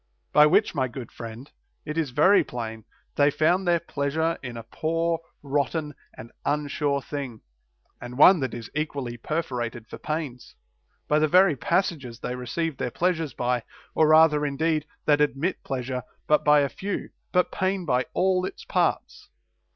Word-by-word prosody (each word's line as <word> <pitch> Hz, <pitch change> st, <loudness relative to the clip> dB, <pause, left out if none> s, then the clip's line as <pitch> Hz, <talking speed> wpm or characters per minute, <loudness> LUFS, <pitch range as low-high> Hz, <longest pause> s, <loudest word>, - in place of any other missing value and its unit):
By 150 Hz, 0 st, +7 dB
which, -, -, +3 dB
my 130 Hz, -2 st, 0 dB
good 125 Hz, 0 st, -8 dB
friend, 115 Hz, +4 st, -9 dB, 0.3 s
it 150 Hz, 0 st, -4 dB
is 160 Hz, -4 st, 0 dB
very 155 Hz, +11 st, +5 dB
plain, 115 Hz, -2 st, -6 dB, 0.3 s
they 145 Hz, 0 st, +5 dB
found 175 Hz, +6 st, +1 dB
their 170 Hz, -1 st, +4 dB
pleasure 160 Hz, +1 st, -1 dB
in 125 Hz, -3 st, -7 dB
a 115 Hz, -, -7 dB
poor, 165 Hz, +7 st, -1 dB, 0.2 s
rotten, 145 Hz, +2 st, -1 dB, 0.2 s
and 115 Hz, -, -10 dB
unsure 145 Hz, -1 st, -1 dB
thing, 135 Hz, -6 st, -6 dB, 0.6 s
and 125 Hz, 0 st, -8 dB
one 180 Hz, +5 st, +8 dB
that 130 Hz, -4 st, -3 dB
is 115 Hz, -2 st, -8 dB
equally 140 Hz, -5 st, -3 dB
perforated 120 Hz, -5 st, -3 dB
for -, -, -9 dB
pains, 150 Hz, -6 st, -5 dB, 0.5 s
by 150 Hz, -, +3 dB
the 155 Hz, -, +3 dB
very 180 Hz, 0 st, +5 dB
passages 145 Hz, -6 st, -1 dB
they 125 Hz, -, -4 dB
receive 135 Hz, +5 st, -3 dB
their 125 Hz, -, -2 dB
pleasures 165 Hz, -3 st, -1 dB
by; 125 Hz, 0 st, 0 dB, 0.3 s
or 155 Hz, -, +4 dB
rather 155 Hz, -1 st, +6 dB
indeed, 155 Hz, +2 st, 0 dB, 0.2 s
that 145 Hz, -1 st, +4 dB
admits 150 Hz, +5 st, 0 dB
pleasure 130 Hz, -1 st, -3 dB, 0.2 s
but 150 Hz, -, +3 dB
by 150 Hz, 0 st, +5 dB
a 140 Hz, -, +1 dB
few, 200 Hz, +7 st, -5 dB, 0.2 s
but 180 Hz, -1 st, +2 dB
pain 185 Hz, -1 st, -1 dB
by 125 Hz, -4 st, +1 dB
all 185 Hz, -1 st, +2 dB
its 325 Hz, -, -6 dB
parts. -, -, -1 dB
150 Hz, 160 wpm, -25 LUFS, 125-165 Hz, 0.6 s, one